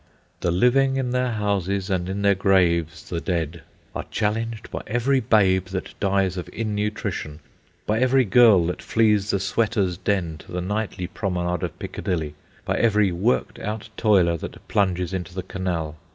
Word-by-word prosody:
"The - - 0
living 130 +9 +3
in 130 -2 -1
their 125 -1 0
houses, 100 -2 -1
and 90 -1 -1
in 100 +1 -3
their 100 0 +5
graves 85 -5 +1
the 85 -1 -3
dead," 85 -2 -2 0.3
are - - -4
challenged 110 +1 -2
by - - -4
every 120 +5 +2
babe 95 -5 +3
that 95 0 -5
dies 95 -2 +1
of 90 - -5
innutrition, 105 -7 -3 0.5
by 110 +1 +1
every 130 0 +4
girl 105 -4 +6
that 90 - -3
flees 105 -3 +2
the 100 - +1
sweater's 100 -2 0
den 85 -7 -1
to - - -14
the 90 - -2
nightly 100 0 -3
promenade 90 -3 -2
of - - -4
Piccadilly, 80 -5 -3 0.3
by - - 0
every 105 -4 +3
worked 100 +8 0
out 110 +1 -5
toiler 95 -7 +3
that - - -9
plunges 90 -3 0
into 90 -1 -4
the 95 - -3
canal. 85 -5 -3
95 Hz, 165 wpm, -23 LUFS, 90-110 Hz, 0.5 s, girl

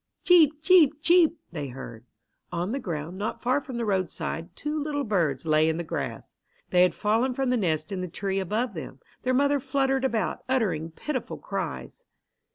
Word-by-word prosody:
"Cheep! 315 -4 +5
cheep! 315 -5 +5
cheep!" 340 0 +4
they 150 -4 -4
heard. 120 -2 -9 0.4
On 175 +3 -2
the 275 - -1
ground, 170 - -5
not 210 - -3
far 255 +4 +1
from 260 -3 -7
the 235 - -1
roadside, 175 -3 -2
two 300 +1 -3
little 290 -1 -2
birds 170 - 0
lay 155 0 +4
in 160 - -1
the 170 - -2
grass. 160 - -5 0.4
They 180 - +5
had 180 - +4
fallen 230 +5 +1
from 265 -1 0
the - - +3
nest 155 -6 -1
in 190 -2 -3
the 180 - -3
tree 195 +2 -2
above 215 +7 -1
them. - - -8 0.2
Their 255 0 +1
mother 285 +1 +3
fluttered 270 0 0
about, 230 -7 0
uttering 200 -11 0
pitiful 255 - -4
cries. - - -5
215 Hz, 180 wpm, -26 LUFS, 170-275 Hz, 0.4 s, Cheep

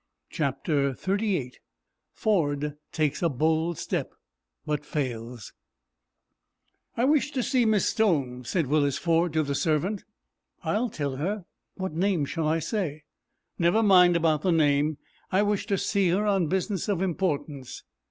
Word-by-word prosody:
CHAPTER 140 -1 0
XXXVIII 190 - -1 0.6
FORD 150 -8 0 0.2
TAKES 155 -2 0
A 170 - +3
BOLD 160 +4 0
STEP, - - -2 0.6
BUT 150 -1 -2
FAILS 120 -6 -4 1.4
"I 240 - +2
wish 290 0 +3
to 265 -4 -2
see 250 -1 +2
Miss 215 -2 +3
Stone," 140 - +1
said 170 +4 0
Willis 145 0 +1
Ford, 170 0 +1
to 155 -1 +2
the 140 -1 -2
servant. 165 +8 0 0.6
"I'll 235 +3 0
tell 140 -7 -3
her. 190 +6 -2 0.3
What 190 -4 -4
name 175 -2 +1
shall 160 +2 -2
I 160 +1 +2
say?" 165 -3 -3 0.6
"Never 175 +6 +3
mind 180 -4 +6
about 160 -3 +2
the 185 - +1
name. 150 -2 +2 0.3
I 190 +2 +3
wish 205 -1 0
to 200 - +1
see 195 -1 +1
her 195 +5 +1
on 195 -5 +2
business 190 +2 -1
of 190 -2 +1
importance." 150 -7 -3
165 Hz, 140 wpm, -27 LUFS, 145-195 Hz, 1.4 s, mind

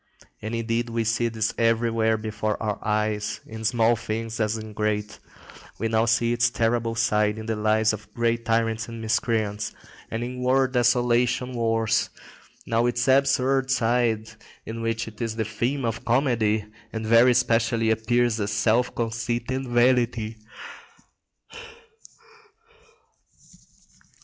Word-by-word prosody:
And 110 +2 -4
indeed 115 +1 -1
we 115 0 -1
see 115 +2 +1
this 110 -1 -1
everywhere 115 -1 +2
before 110 -1 -3
our 105 -2 -2
eyes, 105 -1 -1
in 110 0 -8
small 115 +1 +3
things 115 0 -4
as 110 0 0
in 110 -1 -8
great. 105 0 -2 0.6
Now 110 +1 +1
we 115 - +1
see 115 +1 +2
its 120 0 +2
terrible 115 0 0
side 105 -2 +1
in 110 - -7
the 110 0 -1
lives 110 +1 +2
of 105 -1 -9
great 115 0 0
tyrants 115 -1 0
and 115 -1 -8
miscreants, 110 -2 -1 0.3
and 115 +1 -3
in 125 +1 -5
world 130 +1 +2
desolating 125 +1 +2
wars; 115 -1 +1 0.6
now 115 +1 +1
its 120 +1 -1
absurd 135 0 +3
side, 115 -3 +1 0.4
in 115 +1 -6
which 115 0 -2
it 110 -1 -10
is 115 -1 -2
the 110 -1 -1
theme 120 +6 -2
of 115 -1 -3
comedy, 115 -4 +1 0.3
and 110 0 -4
very 115 +2 +5
specially 115 -1 +2
appears 115 +1 +1
as 100 -1 -2
self 110 +4 +1
conceit 120 +1 -2
and 130 0 -2
vanity. 120 -2 +2
115 Hz, 135 wpm, -25 LUFS, 110-120 Hz, 0.6 s, very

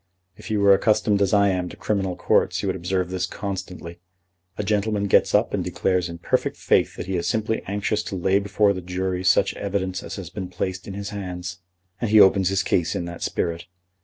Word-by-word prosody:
If - - -11
you 105 -2 0
were 100 -1 +7
accustomed 105 0 +2
as 100 - +2
I 100 -1 +4
am 90 -2 -1
to - - -11
criminal 95 -3 -1
courts - - +1
you - - -1
would - - 0
observe 90 +1 -2
this 95 0 -1
constantly. 95 -4 -6 0.6
A - - -2
gentleman 105 0 0
gets 100 - +3
up - - +2
and - - 0
declares 90 -2 0
in 85 - -7
perfect 85 - -1
faith - - +2
that - - -6
he 95 0 -2
is 85 0 -2
simply 110 +3 0
anxious 105 +2 -1
to 100 - -4
lay 95 +2 +2
before 100 0 +2
the 95 - -5
jury 90 +1 -3
such 90 -1 +3
evidence 95 -2 -2
as - - -7
has - - -8
been 95 -3 -5
placed 90 +1 -4
in 95 - -6
his 100 0 -5
hands. 90 -3 -6 0.4
And 115 - -1
he 110 0 +6
opens 95 -1 +6
his 95 0 +1
case 85 -3 0
in 85 - -2
that 85 0 -8
spirit. 85 -1 -2
95 Hz, 220 wpm, -23 LUFS, 90-100 Hz, 0.6 s, were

